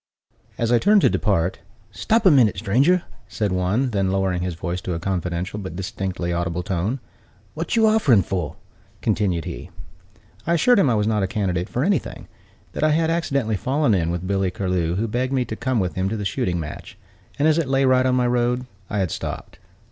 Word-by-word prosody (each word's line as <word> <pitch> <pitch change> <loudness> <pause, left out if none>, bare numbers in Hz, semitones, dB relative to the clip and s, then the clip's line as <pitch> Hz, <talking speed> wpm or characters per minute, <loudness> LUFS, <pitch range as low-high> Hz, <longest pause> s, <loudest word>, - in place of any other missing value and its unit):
As 115 0 0
I 120 - +5
turned 205 - +4
to - - +4
depart, 95 -4 0 0.3
"Stop 225 - 0
a 185 - +8
minute, 120 -9 +4
stranger!" 135 - +2 0.2
said 105 -3 -2
one: 95 +8 0
then 100 -3 0
lowering 95 -2 0
his 90 -1 -3
voice 90 +2 -4
to 90 - -3
a - - -3
confidential 90 +1 -3
but 95 -4 -7
distinctly 95 -1 -3
audible 85 0 -2
tone, 100 +7 -2 0.5
"What 165 +7 -3
you 225 -1 +4
offering 160 - +4
for?" 90 -7 -3 0.5
continued 90 -6 0
he. - - -7 0.8
I 170 - +3
assured 240 +8 +4
him 145 - +4
I 115 - +2
was 105 -1 +1
not 110 -1 +1
a 95 - +1
candidate 90 -2 -2
for 125 - -1
anything; 190 -2 -1 0.4
that - - -4
I 155 - +4
had 160 +1 +2
accidentally 140 -10 0
fallen 135 +2 +1
in 85 -4 +1
with 85 +1 -3
Billy 95 0 0
Curlew, 90 -3 -1
who 110 +4 -1
begged 125 +4 -1
me 130 -2 +1
to 110 - -5
come 130 0 -1
with 90 -2 -1
him 95 +1 -1
to 110 - -3
the 105 - -4
shooting 90 -2 -1
match, 75 - -8 0.4
and, 145 - +3
as 160 +1 +3
it 150 -5 -1
lay 135 0 +3
right 130 0 +4
on 130 - +2
my 125 -1 +2
road, 125 +1 +1 0.2
I 105 - -2
had 95 -5 0
stopped. - - -6
105 Hz, 210 wpm, -22 LUFS, 90-130 Hz, 0.8 s, a